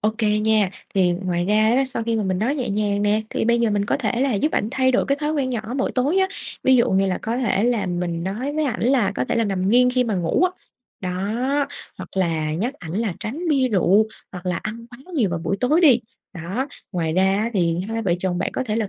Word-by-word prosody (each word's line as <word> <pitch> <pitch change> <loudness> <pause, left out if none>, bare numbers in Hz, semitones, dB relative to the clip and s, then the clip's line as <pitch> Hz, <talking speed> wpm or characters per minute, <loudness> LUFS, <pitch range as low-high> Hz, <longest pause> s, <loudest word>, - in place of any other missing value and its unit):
Ô 215 - +2
kê 210 -1 +2
nha, 215 -3 +2 0.2
thì 185 -3 +3
ngoài 175 -1 -2
ra 215 +4 +3
á, 270 - +3
sau 260 -3 -1
khi 230 -1 0
mà 215 - 0
mình 185 -1 0
nói 245 +8 0
nhẹ 250 -7 -2
nhàng 205 0 0
nè, 210 +1 +2
thì - - -1
bây 235 +1 +2
giờ 230 -2 +2
mình 205 -1 +1
có - - 0
thể 240 -2 -1
là 265 -4 +1
giúp 300 +10 0
ảnh 210 - 0
thay 260 -1 +2
đổi 255 - +2
cái 275 - +1
thói 300 +1 0
quen 275 -4 -1
nhỏ 235 -3 -1 0.2
mỗi 265 - -1
tối 285 +9 +1
á, 380 0 +3 0.4
ví 260 -1 +6
dụ 235 - +3
như 195 +1 +3
là 185 - -1
có 230 +2 -2
thể 215 -5 +1
là 230 -6 +1
mình 175 -1 -2
nói 240 +9 -3
với 310 0 0
ảnh 250 -6 -2
là 245 -5 +2
có 125 - -1
thể - - -2
là 230 - +2
nằm 195 -2 -1
nghiêng 250 +2 +5
khi 250 0 +1
mà 220 -3 -1
ngủ 175 - +1
á, 365 - +2 0.5
đó, 185 -1 -3 0.9
hoặc - - -7
là 160 -4 0
nhắc 230 - -2
ảnh 165 -2 -9
là 210 -3 -1
tránh 315 +11 -4
bia 270 -4 +3
rượu 200 +1 +3 0.3
hoặc 180 0 -8
là 180 -1 0
ăn 230 +4 -6
quá 240 - -12 0.2
nhiều 220 - +2
vào 170 - -2
buổi 195 +4 -2
tối 300 +7 +3
đi, 265 -8 +6 0.3
đó. 190 - -4 0.2
Ngoài 165 -3 -1
ra 185 +2 +2 0.2
á 225 +2 -1
thì 170 -2 +1
hai 225 0 -2
vợ 180 -4 +1
chồng 180 -1 -1
bạn - - -2
có - - -1
thể 215 -2 -2
là 215 -3 -1
215 Hz, 265 wpm, -22 LUFS, 185-250 Hz, 0.9 s, ví